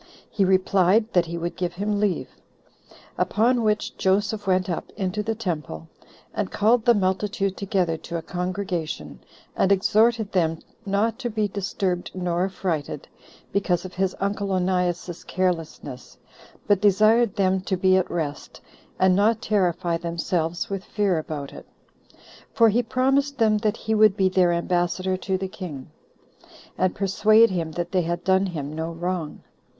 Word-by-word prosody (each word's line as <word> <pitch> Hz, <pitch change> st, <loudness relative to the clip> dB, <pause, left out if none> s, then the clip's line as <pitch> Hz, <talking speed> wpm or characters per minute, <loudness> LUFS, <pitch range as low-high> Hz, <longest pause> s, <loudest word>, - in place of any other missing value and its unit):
He 200 Hz, -, +1 dB
replied, 190 Hz, +3 st, +3 dB
that 175 Hz, -2 st, +3 dB
he 170 Hz, +1 st, -4 dB
would 170 Hz, +1 st, -4 dB
give 180 Hz, -1 st, -2 dB
him 205 Hz, +3 st, -1 dB
leave. 205 Hz, -3 st, 0 dB, 0.9 s
Upon 240 Hz, +3 st, +2 dB
which 215 Hz, -1 st, 0 dB
Joseph 205 Hz, +2 st, 0 dB
went 185 Hz, -1 st, +2 dB
up 175 Hz, -, -4 dB
into 195 Hz, +1 st, -1 dB
the 220 Hz, +1 st, -2 dB
temple, 155 Hz, -, -5 dB, 0.4 s
and -, -, -2 dB
called 220 Hz, +3 st, +2 dB
the 240 Hz, -, +6 dB
multitude 195 Hz, 0 st, 0 dB
together 185 Hz, -4 st, -1 dB
to 170 Hz, +2 st, -6 dB
a 165 Hz, -, -6 dB
congregation, 180 Hz, -2 st, -4 dB, 0.4 s
and 195 Hz, -, +2 dB
exhorted 215 Hz, +2 st, +3 dB
them 165 Hz, -3 st, +1 dB, 0.3 s
not 220 Hz, +4 st, 0 dB
to 245 Hz, -2 st, -2 dB
be 215 Hz, -1 st, 0 dB
disturbed 190 Hz, -2 st, -2 dB
nor 180 Hz, -1 st, 0 dB
affrighted, 180 Hz, -6 st, -3 dB, 0.4 s
because 185 Hz, -3 st, 0 dB
of 185 Hz, -, -8 dB
his 190 Hz, 0 st, -1 dB
uncle 200 Hz, 0 st, -2 dB
Onias's 180 Hz, -2 st, -1 dB
carelessness, 165 Hz, -8 st, -3 dB, 0.5 s
but 205 Hz, -2 st, +2 dB
desired 215 Hz, +2 st, +4 dB
them 190 Hz, -1 st, +1 dB
to 190 Hz, 0 st, -2 dB
be 185 Hz, +1 st, +4 dB
at 185 Hz, -, +1 dB
rest, 150 Hz, -4 st, -4 dB, 0.4 s
and 185 Hz, -1 st, +4 dB
not 215 Hz, +3 st, +3 dB
terrify 180 Hz, -6 st, 0 dB
themselves 170 Hz, 0 st, -2 dB
with 195 Hz, -1 st, -4 dB
fear 200 Hz, -6 st, 0 dB
about 150 Hz, -3 st, -6 dB
it; -, -, -11 dB, 0.9 s
for 230 Hz, -4 st, +6 dB
he 230 Hz, +4 st, +2 dB
promised 270 Hz, +4 st, +1 dB
them 215 Hz, -2 st, +3 dB
that 215 Hz, 0 st, 0 dB
he 220 Hz, -, -2 dB
would 215 Hz, -2 st, +5 dB
be 190 Hz, -1 st, +3 dB
their 185 Hz, -2 st, +3 dB
ambassador 175 Hz, +2 st, 0 dB
to 190 Hz, 0 st, -2 dB
the 190 Hz, +1 st, -3 dB
king, 160 Hz, -9 st, -8 dB, 0.8 s
and 185 Hz, 0 st, 0 dB
persuade 215 Hz, +3 st, +4 dB
him 165 Hz, -3 st, -2 dB
that 175 Hz, +1 st, -4 dB
they 185 Hz, -2 st, +2 dB
had 170 Hz, +1 st, -3 dB
done 190 Hz, +1 st, +3 dB
him 150 Hz, -5 st, -5 dB
no 160 Hz, +1 st, -3 dB
wrong. 170 Hz, -2 st, -4 dB
190 Hz, 155 wpm, -24 LUFS, 175-210 Hz, 0.9 s, the